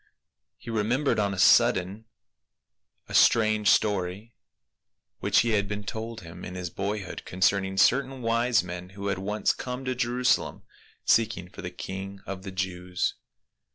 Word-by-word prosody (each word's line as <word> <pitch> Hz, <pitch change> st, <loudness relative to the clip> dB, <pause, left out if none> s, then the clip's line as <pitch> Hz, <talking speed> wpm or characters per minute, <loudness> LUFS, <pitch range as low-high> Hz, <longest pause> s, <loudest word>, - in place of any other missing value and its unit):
He 115 Hz, -, -8 dB
remembered 115 Hz, +5 st, +1 dB
on 100 Hz, -1 st, +1 dB
a 95 Hz, -, -5 dB
sudden 95 Hz, +3 st, +4 dB, 1.0 s
a -, -, -9 dB
strange 110 Hz, -2 st, +4 dB
story 105 Hz, +2 st, +1 dB, 0.9 s
which -, -, +3 dB
had 105 Hz, -4 st, +1 dB
been 105 Hz, 0 st, -4 dB
told 110 Hz, +2 st, -6 dB
him 90 Hz, +1 st, -11 dB
in 90 Hz, -, -7 dB
his 90 Hz, -2 st, -5 dB
boyhood 100 Hz, 0 st, -4 dB
concerning 95 Hz, +1 st, +1 dB
certain 130 Hz, +4 st, +2 dB
wise 115 Hz, -1 st, +2 dB
men 90 Hz, 0 st, -7 dB
who 100 Hz, 0 st, -3 dB
had 95 Hz, -1 st, -1 dB
once 105 Hz, +2 st, 0 dB
come 125 Hz, +1 st, -6 dB
to 130 Hz, -, 0 dB
Jerusalem 125 Hz, 0 st, 0 dB, 0.4 s
seeking 95 Hz, -6 st, +2 dB
for -, -, -10 dB
the 90 Hz, -, -5 dB
king 95 Hz, +2 st, -7 dB
of 95 Hz, -1 st, -6 dB
the 95 Hz, 0 st, -7 dB
Jews. 90 Hz, -1 st, -2 dB
100 Hz, 145 wpm, -27 LUFS, 95-115 Hz, 1.0 s, sudden